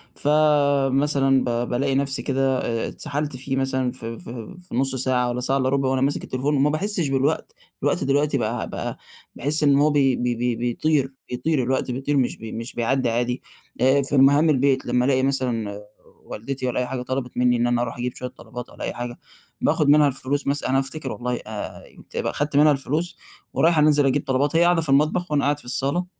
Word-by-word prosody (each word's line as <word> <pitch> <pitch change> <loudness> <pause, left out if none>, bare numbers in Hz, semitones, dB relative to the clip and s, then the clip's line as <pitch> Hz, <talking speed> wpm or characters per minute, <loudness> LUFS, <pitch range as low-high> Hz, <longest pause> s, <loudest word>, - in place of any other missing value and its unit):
فمثلًا 140 -2 +3
ب 120 0 -1
بالاقي 135 +2 0
نفسي 135 0 0
كده 135 -1 0
آآ 115 -1 -2
اتسحَلت 145 -1 -4
فيه 135 +1 -3
مثلًا 130 -1 0
ف 125 -2 -11
ف 115 0 -7 0.4
في - - -5
نُص 135 +1 0
ساعة 125 -1 +1
والّا 120 - -2
ساعة 135 +2 +1
إلّا 130 -1 +1
رُبع 135 -1 +1
وأنا 130 0 0
ماسِك 140 +2 0
التليفون 135 +3 -1
وما 140 +1 +3
باحسّش 175 0 0
بالوقت، 135 +3 0 0.3
الوقت - - +1
دلوقتي 140 +1 +1
بقى 115 -1 -2
بقى - - -5 0.4
باحس 150 +3 0
إن 140 -1 +5
هو 150 +2 +4
بي 140 -3 +3
بي 120 0 -1
بي 120 0 -1
بيطير، 135 +4 0 0.2
بيطير 130 +3 0
الوقت، 130 +1 -1
بيطير 135 +3 -1
مش 130 -3 0
بي 110 -1 -8
مش 115 +2 -6
بيعدّى 125 +1 +1
عادي. 120 +2 -1 0.4
آآ 135 +2 +4
في 140 +1 0
مهام 145 +4 +5
البيت 135 -2 +2
لمّا 125 0 +1
ألاقي 130 -1 +2
مثلًا 120 -7 -1 0.5
والدتي 130 +4 -5
والّا 125 - -1
أي 125 - 0
حاجة 130 -2 -4
طلَبِت 125 0 -4
منّي 125 0 +3
إن 120 +1 +1
أنا 120 0 +1
أرُوح 120 -1 -3
أجيب 125 0 -3
شوية 125 - -5
طلبات 125 -1 -10
والّا - - -10
أي - - -3
حاجة 120 0 -6 0.4
باخذ 150 - +2
منها 150 0 +6
الفلوس 140 +1 -2
مث 140 +1 0
أنا 135 +1 +1
هافتكر 135 0 -4
والله 125 0 -3
آآ، - - -5
آآ 105 -1 -6 0.3
يبقي - - -1
أخدت 145 0 -1
منها 150 +1 +6
الفلوس 150 +5 -2 0.4
ورايح 165 0 +3
أنزِل 150 -1 +4
أجيب 135 +2 +1
طلبات 140 +4 +1
هي 170 - +5
قاعدة 175 -1 +3
في 155 - -4
المطبخ 155 +5 +2
وأنا 145 -1 +2
قاعد 145 +1 +1
في - - -15
الصالة، 140 +8 -1
135 Hz, 205 wpm, -23 LUFS, 125-145 Hz, 0.5 s, منها